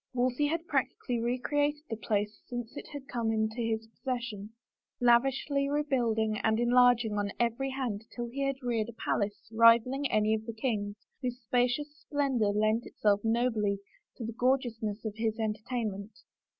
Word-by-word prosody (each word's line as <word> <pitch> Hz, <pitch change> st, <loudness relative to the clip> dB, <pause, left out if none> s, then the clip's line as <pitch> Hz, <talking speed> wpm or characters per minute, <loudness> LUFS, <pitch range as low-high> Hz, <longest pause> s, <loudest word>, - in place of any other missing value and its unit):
Wolsey 255 Hz, +3 st, +2 dB
had 330 Hz, +2 st, -2 dB
practically 245 Hz, -7 st, -1 dB
re 240 Hz, +2 st, 0 dB
created 290 Hz, +3 st, 0 dB
the 225 Hz, -, -3 dB
place 210 Hz, -1 st, -2 dB
since 240 Hz, -2 st, -5 dB
it -, -, -7 dB
had 285 Hz, -2 st, -8 dB
come 235 Hz, -3 st, -1 dB
into 220 Hz, +1 st, 0 dB
his 225 Hz, -1 st, -1 dB
possession, 230 Hz, -3 st, -5 dB, 0.5 s
lavishly 270 Hz, +3 st, +3 dB
rebuilding 235 Hz, -7 st, +1 dB
and 220 Hz, 0 st, +2 dB
enlarging 240 Hz, -3 st, +4 dB
on 205 Hz, 0 st, -1 dB
every 240 Hz, +3 st, +1 dB
hand 245 Hz, -6 st, -3 dB
till 240 Hz, -, -3 dB
he 265 Hz, +4 st, -5 dB
had 275 Hz, -1 st, -1 dB
reared 235 Hz, -2 st, 0 dB
a -, -, -8 dB
palace 205 Hz, -2 st, -2 dB
rivaling 230 Hz, +5 st, +5 dB
any 215 Hz, 0 st, +3 dB
of 220 Hz, +1 st, -2 dB
the 230 Hz, -, -4 dB
king's, 215 Hz, -3 st, -2 dB, 0.3 s
whose 250 Hz, -1 st, -3 dB
spacious 250 Hz, +5 st, 0 dB
splendor 275 Hz, -7 st, 0 dB
lent 215 Hz, +3 st, +1 dB
itself 205 Hz, -1 st, +1 dB
nobly 225 Hz, -3 st, +1 dB, 0.4 s
to 235 Hz, -, -5 dB
the 230 Hz, -, -4 dB
gorgeousness 230 Hz, -4 st, 0 dB
of 215 Hz, -, -2 dB
his 220 Hz, 0 st, 0 dB
entertainment. 215 Hz, -2 st, -3 dB
235 Hz, 160 wpm, -30 LUFS, 220-255 Hz, 0.5 s, rivaling